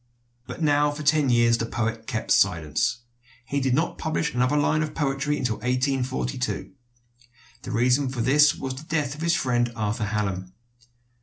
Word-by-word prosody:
But 165 - -6
now 145 -1 +3
for 145 +1 -6
ten 150 -2 +3
years 120 -1 +3
the 115 - -2
poet 115 -1 -3
kept 110 - -3
silence. 95 - +2 0.4
He 140 +2 -1
did 130 -1 +1
not 160 +4 -1
publish 160 -1 -1
another 125 +4 +1
line 155 +1 +2
of 155 -1 -3
poetry 145 0 -1
until 115 -4 -1
1842. 125 - -2 0.9
The - - -7
reason 125 +3 +2
for 130 -2 -3
this 150 +5 +5
was 130 -1 -4
the 130 +4 -9
death 150 -4 -1
of 150 - -10
his 170 0 +2
friend 120 -5 0
Arthur 110 0 -2
Hallam. 95 -3 -3
130 Hz, 165 wpm, -25 LUFS, 115-145 Hz, 0.9 s, this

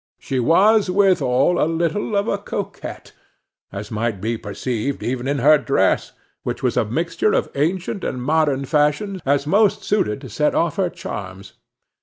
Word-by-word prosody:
She 130 - -3
was 195 - +4
withal 180 -5 +3
a 155 - +1
little 170 +6 -1
of 200 +2 0
a 200 - 0
coquette, 200 0 -6 0.6
as 100 +3 -7
might 110 -2 -2
be 115 +4 -2
perceived 115 +5 -4
even 125 +1 -2
in 140 +1 0
her 150 +4 +5
dress, 115 -10 +1 0.3
which - - -5
was - - +1
a - - +3
mixture 165 - 0
of - - 0
ancient 180 +7 -1
and 130 - -3
modern 145 0 +1
fashions, 150 +7 0
as 140 0 +2
most 200 +5 +2
suited 105 - 0
to 135 - -8
set 150 +8 0
off 170 +2 0
her 190 -2 +1
charms. 100 - -8
150 Hz, 165 wpm, -21 LUFS, 125-185 Hz, 0.6 s, her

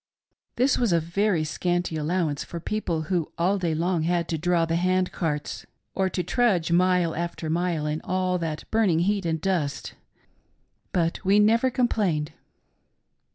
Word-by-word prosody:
This 255 +3 +2
was 235 -5 +2
a 170 - +4
very 170 +1 0
scanty 175 +2 -1
allowance 155 -1 -1
for 170 - -7
people 170 -4 -2
who 170 -1 -1
all 185 +4 +1
day 170 -3 0
long 170 +1 0
had 170 +1 0
to 165 - -1
draw 175 0 +2
the 165 0 -1
hand 185 +1 +1
carts 150 -4 -3 0.3
or 190 -1 +1
to 180 0 -2
trudge 195 -10 +1
mile 180 -1 +3
after 170 -1 -3
mile 170 -2 0
in 150 +1 -2
all 185 0 -1
that 160 -2 -3
burning 200 -7 +3
heat 195 0 0
and 160 -1 -1
dust 165 -6 -2 0.5
— - - -44
but 170 -2 0
we 195 +2 +4
never 225 +5 +4
complained. 200 - 0
175 Hz, 160 wpm, -25 LUFS, 165-190 Hz, 0.5 s, a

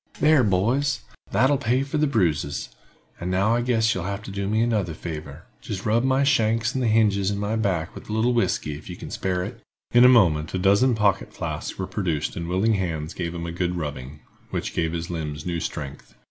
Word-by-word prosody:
"There, 150 -3 +5
boys, 120 +8 +1 0.3
that'll 135 +1 +3
pay 125 +4 +1
for 145 +2 -2
the 150 - +3
bruises; 80 - 0 0.5
and 90 - -3
now 95 +5 +2
I 120 - +2
guess 115 -3 +2
you'll 90 -2 -4
have 100 +1 -4
to 100 - -7
do 100 0 -3
me 110 +2 +1
another 105 -9 0
favor—jist 80 +5 -7
rub 115 +2 +2
my 130 +1 +3
shanks 115 -3 +2
and 130 - -1
the - - +2
hinges 105 -3 +3
in 100 - -2
my 105 +2 -1
back 95 -6 -1
with - - -11
a - - -3
little 115 +3 +2
whisky, 90 -9 0
if 75 - -11
you 90 - -5
can - - -9
spare 90 -1 -1
it." - - -7 0.3
In 120 +1 +7
a 125 - +9
moment 85 -10 +4
a - - +1
dozen 100 +7 +4
pocket 105 -3 +1
flasks - - -4
were 95 - -2
produced 85 -8 -2
and 85 0 -4
willing 95 +5 +2
hands 85 -5 -2
gave 85 -1 -4
him 85 -1 -4
a 85 - -4
good 90 +1 -1
rubbing, 75 -3 -5 0.3
which - - -3
gave 80 -1 0
his 85 +1 -4
limbs 75 -3 -4
new 85 -1 -2
strength. 70 -2 -6
100 Hz, 215 wpm, -24 LUFS, 85-115 Hz, 0.5 s, a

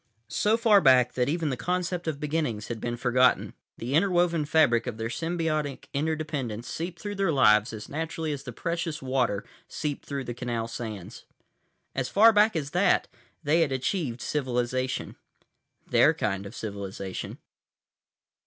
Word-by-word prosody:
So 215 - +2
far 220 -4 +5
back 130 -4 +5
that 125 +1 0
even 160 -1 0
the - - -1
concept 180 +5 -2
of 150 -3 -2
beginnings 150 -8 -2
had 115 -2 -4
been 120 0 -3
forgotten, 125 +1 +3 0.2
the 120 +4 -4
interwoven 175 -2 +2
fabric 145 -6 +3
of 120 -3 -4
their 115 0 -3
symbiotic 155 0 -2
interdependence 145 -6 -2
seeped 170 +1 -5
through 205 -1 -4
their 195 -3 +1
lives 105 -6 +4
as 110 -1 -7
naturally 160 +1 -3
as 145 -2 -4
the 135 -3 -7
precious 170 +2 -3
water 125 -6 0 0.2
seeped 150 -2 -4
through 140 -1 -3
the 120 - -5
canal 115 -1 -3
sands. 110 -5 -7 0.7
As 130 -1 -2
far 225 +3 +6
back 210 0 +4
as 145 -3 -2
that, 180 +3 +2 0.3
they 160 +3 +3
had 155 -4 +2
achieved 130 - -2
civilization. 130 -2 -2 0.7
Their - - +4
kind 100 -1 -2
of 105 - -11
civilization. 100 -3 -5
140 Hz, 155 wpm, -27 LUFS, 120-165 Hz, 0.7 s, far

